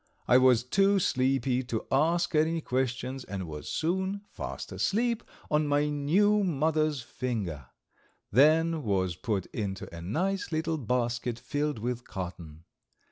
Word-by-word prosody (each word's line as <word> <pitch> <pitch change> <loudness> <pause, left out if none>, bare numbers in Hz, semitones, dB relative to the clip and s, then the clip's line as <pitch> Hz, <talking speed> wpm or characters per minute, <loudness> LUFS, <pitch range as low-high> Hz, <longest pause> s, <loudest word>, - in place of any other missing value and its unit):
I 125 - +6
was 125 -2 +5
too 195 +9 +3
sleepy 130 -5 +1
to 115 -3 -3
ask 165 +6 +2
any 160 +2 +2
questions 130 -1 -2
and 95 -3 -5
was 75 -1 -7
soon 190 +4 -1
fast - - -6
asleep 235 +2 0 0.3
on 150 0 +2
my 145 +1 +2
new 190 +9 +3
mother's 155 -4 +1
finger; 100 - -4 0.6
then 160 +6 +4
was 95 - 0
put 105 -2 -2
into 95 -5 -4
a 85 - -7
nice 185 - -1
little 160 0 -1
basket 120 -1 -1
filled 145 +2 -2
with 120 +2 -3
cotton. 85 -4 -7
135 Hz, 135 wpm, -29 LUFS, 115-160 Hz, 0.6 s, I